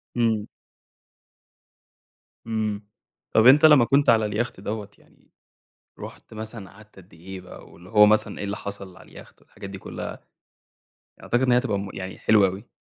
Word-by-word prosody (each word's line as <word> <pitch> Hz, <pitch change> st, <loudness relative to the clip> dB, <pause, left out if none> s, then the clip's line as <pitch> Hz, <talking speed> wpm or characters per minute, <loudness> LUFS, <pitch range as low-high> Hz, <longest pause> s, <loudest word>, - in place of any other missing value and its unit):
امم. 115 Hz, -3 st, 0 dB, 2.0 s
امم. 110 Hz, -2 st, -3 dB, 0.5 s
طَب 110 Hz, -, +4 dB
أنت 145 Hz, +4 st, +7 dB
لمّا 150 Hz, -6 st, +7 dB
كنت 140 Hz, +3 st, +3 dB
على 110 Hz, -2 st, +4 dB
اليخت 105 Hz, 0 st, -3 dB
دوّة 105 Hz, 0 st, -5 dB
يعني -, -, -28 dB, 0.7 s
رُحت -, -, -11 dB
مثلًا 110 Hz, -3 st, -8 dB
قعدت 105 Hz, +1 st, -19 dB
قد 95 Hz, -2 st, -17 dB
إيه 90 Hz, +3 st, -10 dB
بقى؟ -, -, -13 dB
واللي 90 Hz, +2 st, -16 dB
هو 105 Hz, -1 st, +6 dB
مثلًا 110 Hz, +1 st, +1 dB
إيه -, -, -5 dB
اللي 100 Hz, +1 st, -3 dB
حصل 100 Hz, -2 st, -9 dB
على -, -, -16 dB
اليخت -, -, -15 dB
والحاجات 95 Hz, -, -12 dB
دي 95 Hz, -, -8 dB
كلّها؟ -, -, -7 dB, 1.0 s
أعتقد 120 Hz, -, 0 dB
إن 125 Hz, -, +2 dB
هي 120 Hz, -, +5 dB
هتبقى 110 Hz, -6 st, -1 dB
مُ 100 Hz, 0 st, -5 dB
يعني 95 Hz, 0 st, -7 dB
حلوة 105 Hz, -3 st, +4 dB
أوي. 95 Hz, +5 st, -9 dB
105 Hz, 165 wpm, -24 LUFS, 100-115 Hz, 2.0 s, أنت